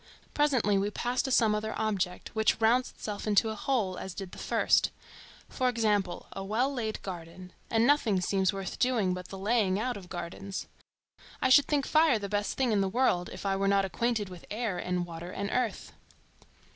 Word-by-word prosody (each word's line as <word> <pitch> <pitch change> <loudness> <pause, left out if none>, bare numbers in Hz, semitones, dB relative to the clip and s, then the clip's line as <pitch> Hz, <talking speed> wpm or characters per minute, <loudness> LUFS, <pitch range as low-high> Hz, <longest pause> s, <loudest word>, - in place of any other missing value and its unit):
Presently 255 -9 +2
we 200 +1 0
pass 245 +4 -1
to - - -3
some 225 -4 +4
other 220 +1 -2
object, 195 -5 -2
which 220 -1 +2
rounds 235 +3 +3
itself 210 0 -6
into 215 +2 +3
a - - -5
whole 210 -6 -1
as 190 - -7
did 195 -3 -6
the - - -10
first; - - +2 0.6
for 255 -2 0
example 210 -6 0
a 195 - -6
well 235 +8 0
laid 220 -4 -3
garden; 180 0 -8 0.2
and 225 0 +3
nothing 240 -9 +3
seems 190 +1 +1
worth 195 -2 -6
doing 230 -8 +2
but 180 0 -6
the 195 - -8
laying 200 -1 +1
out 245 0 -2
of 185 -3 -11
gardens. 185 +3 -5 0.7
I - - +2
should 280 +2 +7
think 285 -3 +1
fire 310 -5 +4
the 205 -1 -4
best 205 0 -1
thing 260 -3 +2
in 205 -2 +2
the 195 - +1
world, 190 -6 +1
if - - -8
I 195 -1 +1
were 195 +1 0
not 195 0 +3
acquainted 220 +2 -1
with 180 -2 -11
air, 215 -3 -2
and 180 -1 -1
water, 170 0 -8
and 200 +2 -4
earth. 250 - -2
205 Hz, 195 wpm, -29 LUFS, 190-240 Hz, 0.7 s, should